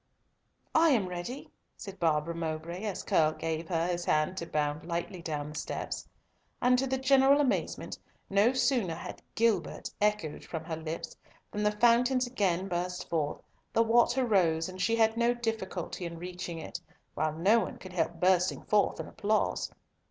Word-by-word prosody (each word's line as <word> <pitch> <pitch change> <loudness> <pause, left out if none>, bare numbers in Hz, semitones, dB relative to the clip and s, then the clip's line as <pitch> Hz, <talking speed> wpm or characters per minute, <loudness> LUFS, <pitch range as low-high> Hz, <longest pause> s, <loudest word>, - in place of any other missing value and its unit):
"I 325 +1 +5
am 225 -10 +3
ready," 180 +10 -6 0.3
said 195 -3 -9
Barbara 160 0 +1
Mowbray, 165 +3 -4
as 205 -3 -3
Curll 155 -1 +3
gave 160 0 -3
her 165 -2 +1
his 175 0 -1
hand 155 +4 +1
to 170 - -4
bound 150 0 -1
lightly 170 +2 -4
down 150 -3 -3
the - - -11
steps. - - -4 0.5
And 250 0 +4
to 270 - 0
the 265 +1 0
general 270 +1 +5
amazement, 280 -3 -1 0.3
no 200 +4 +4
sooner 250 -9 +1
had - - -8
"Gilbert" 230 -1 +1
echoed 210 -8 0
from 160 -2 -5
her 165 0 -4
lips 160 +1 -5 0.4
than 210 - -3
the 210 0 +3
fountains 245 +3 +4
again 195 -7 0
burst 180 0 -3
forth, 155 -3 -1 0.3
the 230 - +4
water 240 +3 +3
rose, 165 -7 +2
and 185 0 -7
she 230 +5 +2
had 225 0 +3
no 235 +1 +3
difficulty 190 -7 -3
in 170 0 -8
reaching 175 -1 -6
it, 160 - -6 0.3
while 155 0 0
no 195 +9 +4
one - - -4
could 185 -1 -11
help 175 -1 0
bursting 180 0 +2
forth 210 -1 +2
in - - -4
applause. 215 0 0
185 Hz, 170 wpm, -30 LUFS, 165-230 Hz, 0.5 s, I